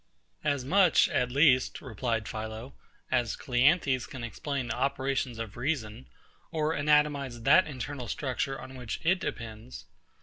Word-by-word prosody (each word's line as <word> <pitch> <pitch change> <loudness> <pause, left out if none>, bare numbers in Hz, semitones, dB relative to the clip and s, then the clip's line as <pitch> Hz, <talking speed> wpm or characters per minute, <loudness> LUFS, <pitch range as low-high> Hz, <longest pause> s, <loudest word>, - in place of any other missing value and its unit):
As 145 -4 0
much, 180 +2 +5
at 125 - +1
least, 135 -2 +4
replied 115 -3 -2
PHILO, 110 +3 -6 0.4
as 120 -2 +1
CLEANTHES 130 0 +2
can 130 -3 -8
explain 130 +2 -4
the 115 - -1
operations 135 -2 -1
of 115 -3 -6
reason, 120 - -3 0.4
or 155 0 0
anatomise 145 -5 +1
that 160 +8 +6
internal 130 -2 -5
structure 135 0 -2
on 130 0 -9
which 125 -4 -5
it 180 +3 +3
depends. 115 -3 -6
130 Hz, 135 wpm, -29 LUFS, 120-145 Hz, 0.4 s, that